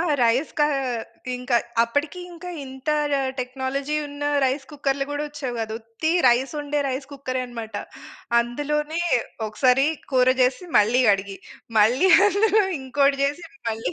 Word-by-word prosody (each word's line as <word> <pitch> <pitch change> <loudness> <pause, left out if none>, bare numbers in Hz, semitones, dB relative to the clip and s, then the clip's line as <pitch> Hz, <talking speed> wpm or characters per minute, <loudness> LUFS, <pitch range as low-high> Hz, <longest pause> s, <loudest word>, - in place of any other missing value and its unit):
ఆ! - - +2 0.2
రైస్‌కా 265 +6 +2 0.7
ఇంకా 250 -1 0 0.3
అప్పటికి 290 +9 -2
ఇంకా 350 +1 -8
ఇంత 265 +2 -5 0.5
టెక్నాలజీ 265 +3 -2
ఉన్న 285 0 -6 0.2
రైస్ 270 +2 0
కుక్కర్‌లు 275 -1 -1
కూడా 290 +1 -2
వచ్చేవి 285 -4 -5
కాదు. 220 0 -3
ఉత్తి 230 +8 -3 0.2
రైస్ 245 +3 +2
వండే 290 0 -1
రైస్ 265 +1 -3
కుక్కరే 255 -2 -3
అన్నమాట. 230 -3 -8 0.7
అందులోనే 295 +6 -2 0.5
ఒకసారి 255 +5 +3 0.3
కూర 255 -1 +4 0.2
చేసి 255 +8 0
మళ్ళీ 230 +5 +4
అడిగి, 195 0 -6 0.4
మళ్ళీ 250 - +4 0.2
అందులో 415 +2 +3 0.2
ఇంకోటి 275 +1 +1
చేసి 290 +5 -2
అది 275 - -23
మళ్ళి 220 -5 -3
270 Hz, 135 wpm, -23 LUFS, 245-295 Hz, 0.7 s, కూర